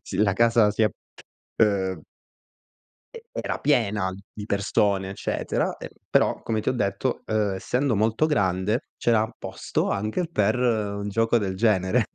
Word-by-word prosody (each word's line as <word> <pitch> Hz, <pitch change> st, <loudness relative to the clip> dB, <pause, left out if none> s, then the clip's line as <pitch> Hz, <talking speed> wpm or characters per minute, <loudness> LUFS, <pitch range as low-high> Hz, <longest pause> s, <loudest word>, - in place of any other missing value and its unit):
si 95 Hz, -, -6 dB
la 100 Hz, -1 st, +3 dB
casa 115 Hz, -1 st, +4 dB
sia, 110 Hz, +1 st, +2 dB, 0.7 s
uhm 100 Hz, -4 st, +1 dB, 1.1 s
e 465 Hz, 0 st, -10 dB
era -, -, -3 dB
piena 105 Hz, -9 st, +1 dB, 0.2 s
di 105 Hz, -, -7 dB
persone, 100 Hz, -1 st, +1 dB
eccetera, 95 Hz, -, -2 dB
ehm, -, -, -8 dB, 0.2 s
però, -, -, +2 dB
come 110 Hz, -1 st, -1 dB
ti -, -, -2 dB
ho -, -, +3 dB
detto, 120 Hz, +2 st, -1 dB
uhm, 105 Hz, -2 st, +1 dB
essendo 125 Hz, +7 st, 0 dB
molto 110 Hz, +7 st, +2 dB
grande, 105 Hz, -, 0 dB
c'era 110 Hz, -2 st, +2 dB
posto -, -, -2 dB
anche 110 Hz, -, -1 dB
per 110 Hz, -7 st, +2 dB
un 105 Hz, -4 st, 0 dB
gioco 115 Hz, +3 st, +2 dB
del 100 Hz, -3 st, -2 dB
genere. 105 Hz, +1 st, +2 dB
105 Hz, 145 wpm, -25 LUFS, 100-115 Hz, 1.1 s, casa